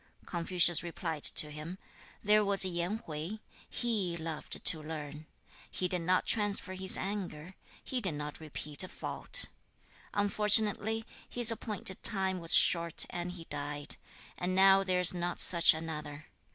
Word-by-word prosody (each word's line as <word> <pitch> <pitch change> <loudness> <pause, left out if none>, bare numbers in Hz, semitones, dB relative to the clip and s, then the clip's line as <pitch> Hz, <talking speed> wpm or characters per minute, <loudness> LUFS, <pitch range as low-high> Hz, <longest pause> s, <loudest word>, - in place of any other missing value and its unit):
Confucius 175 -1 +3
replied 165 -2 -6
to 150 - +2
him, 155 +5 -8 0.5
'There 210 +1 +3
was 200 -1 +3
Yen 175 +3 -2
Hui; 160 +7 -6 0.3
HE 205 -8 -2
loved 160 -1 -5
to 160 -4 +4
learn. 150 -1 -8 0.4
He 185 - -3
did 180 -1 -2
not 180 +2 0
transfer 205 -3 +1
his 190 0 +3
anger; 185 -4 -6 0.3
he 255 -2 -3
did 185 -8 -1
not 150 0 -7
repeat 150 0 -2
a - - -6
fault. - - -1 0.7
Unfortunately, 210 +2 +1 0.2
his 240 -1 +7
appointed 210 -4 -5
time 190 -3 +2
was 165 -1 +6
short 170 -2 +2
and 175 0 -5
he 175 -2 -9
died; 145 -1 -4 0.4
and 180 +1 -2
now 195 0 +5
there 185 -1 0
is 180 - +4
not 175 0 -4
such 170 -2 +6
another. 155 -2 -6
180 Hz, 145 wpm, -31 LUFS, 160-195 Hz, 0.7 s, his